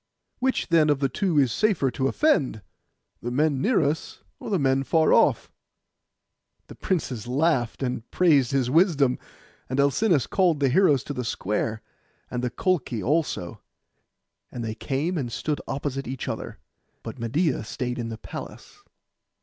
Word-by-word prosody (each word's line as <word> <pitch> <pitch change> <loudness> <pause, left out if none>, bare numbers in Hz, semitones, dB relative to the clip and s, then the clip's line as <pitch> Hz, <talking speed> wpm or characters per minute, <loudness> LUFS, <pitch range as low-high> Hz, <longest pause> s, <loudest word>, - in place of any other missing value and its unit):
Which, 260 -4 0
then, 160 -2 +4
of 145 - +3
the 135 -1 0
two 180 0 0
is 135 -4 +4
it - - -2
safer 190 - +1
to 130 +2 -1
offend—the 125 - -2
men 140 +1 +1
near 235 - +3
us, 150 +3 -3 0.2
or - - -7
the 200 - +2
men 135 -3 +2
far 160 +4 +3
off?' - - +3 1.1
The - - -12
princes 135 - -3
laughed, 135 -2 0
and 125 -2 -3
praised 145 -9 +3
his 135 -3 +1
wisdom; 150 -6 +3 0.5
and 130 +2 -2
Alcinous 140 - +3
called 175 -6 +2
the 140 -2 +2
heroes 145 -3 +4
to 145 - -5
the 125 -2 -3
square, 110 0 -2 0.5
and 125 0 -3
the 125 - 0
Colchi 140 - -1
also; 145 - -1 0.9
and 120 - -5
they 110 - -3
came 145 +9 -2
and 120 -4 -4
stood 150 +5 -2
opposite 135 -1 -3
each 130 0 -5
other, - - -5 0.5
but - - -8
Medeia 125 +3 0
stayed 125 +2 -4
in 115 -1 -3
the 110 - -6
palace. - - -10
135 Hz, 160 wpm, -25 LUFS, 125-160 Hz, 1.1 s, then